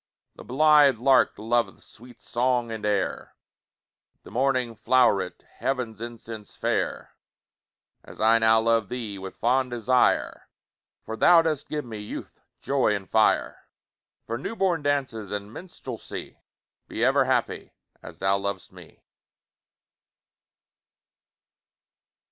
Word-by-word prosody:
The - - -12
blithe 145 -1 +5
lark 130 +2 +4
loveth 115 +2 -1
Sweet 120 +2 -15
song 120 -1 -1
and 110 -1 -6
air, 100 -2 -2 0.9
The - - -13
morning 130 -2 0
flow'ret 105 -6 +2 0.2
Heav'n's 125 -5 -2
incense 115 -2 -8
fair, - - -2 0.9
As - - -14
I 115 +1 +4
now 110 0 +4
love 115 -2 +1
thee 115 -5 -5
With 95 0 -9
fond 130 +2 +1
desire, 120 +1 +1 0.6
For 110 - -5
thou 165 +8 +6
dost 155 -3 -2
give 150 -2 -3
me 110 -3 -7
Youth, 105 - -8 0.2
joy, 135 -6 +2
and 95 -2 -6
fire, 110 -1 +1 0.6
For 115 +1 -4
new 225 - -5
born 185 -6 +1
dances 135 -8 -2
And 105 +1 -5
minstrelsy. 130 -9 -8 0.5
Be - - -1
ever - - +3
happy, - - -1 0.3
As - - -11
thou 95 +1 +1
lov'st 100 0 -4
me! - - -16
115 Hz, 120 wpm, -25 LUFS, 110-130 Hz, 0.9 s, thou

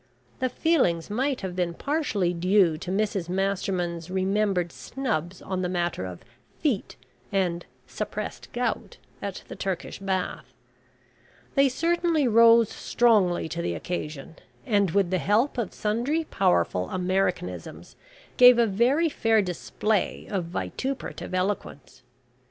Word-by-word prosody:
The 255 -1 +1
feelings 210 - +1
might 260 +4 0
have 185 -2 -4
been 175 -2 -1
partially 245 - 0
due 180 -1 +3
to 165 - -7
Mrs 195 -3 -1
Masterman's 180 -3 -1
remembered 190 -1 0
snubs 190 - -4
on 185 -1 -3
the 180 - -1
matter 175 - -1
of 90 +2 -9 0.4
"feet," 270 -11 -1 0.4
and 180 -3 0 0.2
"suppressed - - -5
gout," 240 -2 -2 0.2
at 200 -2 -5
the - - -8
Turkish 190 -3 -4
Bath. 190 -2 -3 1.0
They 275 -1 +4
certainly 330 0 +1
rose 230 -1 +6
strongly 210 -9 +2
to 170 - -3
the - - -2
occasion, 155 -4 -5 0.3
and, 205 -6 +2
with 190 +1 +1
the 185 - +1
help 230 - +1
of 215 -6 -2
sundry 240 +10 -1
powerful 90 - +1
Americanisms, 180 - -2 0.4
gave 250 -1 +9
a 235 - +5
very 240 - +2
fair 225 -7 +2
display 195 +3 -1
of 190 -4 -1
vituperative 255 +5 -4
eloquence. 185 -7 -3
195 Hz, 125 wpm, -26 LUFS, 175-235 Hz, 1.0 s, gave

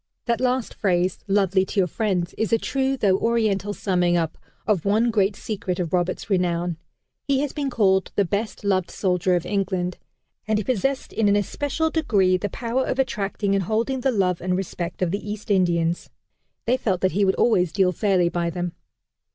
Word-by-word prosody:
That 235 0 0
last 255 -1 0
phrase, 180 -2 0
"lovely 195 -1 +3
to 195 - -2
your 190 - +4
friends," 180 -2 -1
is 220 - -2
a 230 - +5
true 270 +3 -1
though 195 -5 +2
Oriental 215 -3 +1
summing 180 -4 +1
up 165 -2 -1 0.3
of 200 -7 +1
one 220 +4 +2
great 200 -2 +2
secret 190 -4 -4
of 170 -2 -3
Roberts' 180 +1 0
renown. 175 -3 0 0.5
He 275 -1 +2
has 290 -2 -2
been 285 -2 -2
called 190 -6 +2
the 200 - +3
"best 205 +5 -3
loved 190 -3 +1
soldier 180 -1 +1
of 175 -1 -1
England." 185 -2 -1 0.5
And 220 -1 +2
he 210 - -1
possessed 260 +5 -1
in 215 -2 +2
an 200 - +4
especial 290 - -1
degree 200 - +2
the 205 +3 -2
power 240 +6 -1
of - - -1
attracting 205 -5 -1
and 195 -2 +1
holding 230 +6 0
the 265 - +2
love 185 -6 +1
and 180 +1 0
respect 180 -1 -4
of 170 - 0
the 200 - -2
East 210 0 -5
Indians. 175 -3 +1 0.6
They 250 +3 +2
felt 190 -7 -1
that 185 - +2
he 200 +5 +1
would 190 -1 +3
always 180 -8 +3
deal 190 0 +2
fairly 185 -1 +2
by 170 0 -1
them. 175 0 -3
195 Hz, 190 wpm, -23 LUFS, 180-220 Hz, 0.6 s, a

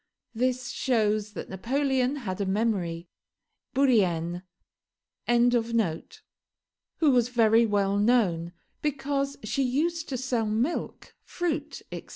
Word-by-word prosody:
This 255 +1 -1
shows 215 -4 0
that - - -6
Napoleon 260 +5 0
had 205 -8 -4
a - - 0
memory. 190 -5 -1 0.7
Bourrienne.] 180 -10 +2 2.6
who 310 -4 +4
was 245 -2 +3
very 230 -1 +4
well 200 -1 +1
known, 200 -7 +2 0.3
because 280 -1 -1
she 215 +6 -1
used 315 +6 0
to 260 - -2
sell 245 -3 -1
milk, 230 +10 -2
fruit, 315 -4 -3
etc. - - -7
235 Hz, 105 wpm, -27 LUFS, 205-275 Hz, 2.6 s, who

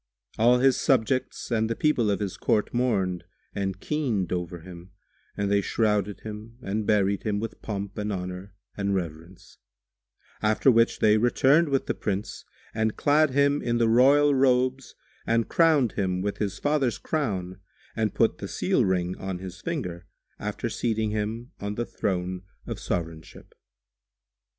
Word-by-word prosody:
All 120 +2 +5
his 130 0 +4
subjects 130 -2 0
and 110 -1 +1
the 115 - -1
people 125 -7 +2
of 100 0 0
his 100 -3 -3
court 105 - 0
mourned 95 -8 0 0.3
and 95 -1 -3
keened 115 - -1
over 90 -1 -4
him 90 +1 -12 0.4
and 100 0 0
they 100 0 +3
shrouded 105 -2 0
him 110 +2 -8
and 105 +2 -2
buried 100 -2 +2
him 105 -2 -1
with 115 +1 -6
pomp 100 -2 -5
and 105 0 -2
honour 90 +1 -6 0.2
and 100 -1 -1
reverence; 85 +2 -7 0.8
after 110 +5 +4
which 115 0 +2
they 110 0 +5
returned 135 +7 +4
with 135 -1 +1
the - - -1
Prince 100 0 -4 0.3
and 110 -1 -1
clad 150 +1 +4
him 140 +2 +2
in 120 -1 0
the 115 -1 +3
royal 140 +5 +5
robes 130 0 +1 0.3
and 115 0 +1
crowned 155 -9 +4
him 90 -1 -1
with 100 0 -3
his 100 -2 -2
father's 145 -4 +1
crown 95 - -3 0.4
and 110 -2 -1
put - - +2
the - - -5
seal - - +1
ring 90 -1 0
on 95 -1 -4
his 90 -1 -9
finger, 90 - -4 0.3
after - - -3
seating 110 -2 -1
him 110 +3 -3
on 100 +1 -4
the 120 - -2
Throne 90 -4 -2 0.2
of - - -5
Sovranship. 80 -2 -5
105 Hz, 155 wpm, -26 LUFS, 95-125 Hz, 0.8 s, All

